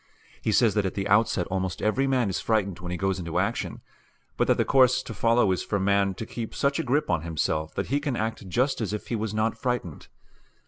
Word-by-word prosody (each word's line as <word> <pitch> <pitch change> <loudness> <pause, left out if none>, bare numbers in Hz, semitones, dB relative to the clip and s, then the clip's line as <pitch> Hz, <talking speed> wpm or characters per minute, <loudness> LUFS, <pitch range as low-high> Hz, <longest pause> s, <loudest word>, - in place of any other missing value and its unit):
He 110 - 0
says 110 -1 +4
that 105 -1 +1
at - - -5
the 100 0 -2
outset 105 -3 +3
almost 95 -2 -2
every 130 +6 +1
man 130 -4 +2
is 95 - -2
frightened 100 -5 0
when 90 -1 -6
he 90 - -3
goes 95 +1 -1
into 85 -2 -3
action, - - -1 0.5
but - - +1
that - - +3
the - - +2
course 130 -1 +4
to 115 - -7
follow 115 -1 +3
is 90 -1 0
for 100 - -1
the 95 - -1
man 100 -1 +2
to 115 - -5
keep 115 -1 -6
such 140 0 +1
a - - 0
grip 135 -3 +1
on 85 -3 +1
himself 80 -1 -2
that - - -3
he 145 - +3
can 145 -3 -2
act 110 -4 -3
just 130 +7 +1
as 105 -2 -2
if 105 - -5
he 120 - 0
was 110 -1 -2
not 110 +1 0
frightened. 125 - -3
105 Hz, 245 wpm, -26 LUFS, 95-120 Hz, 0.5 s, says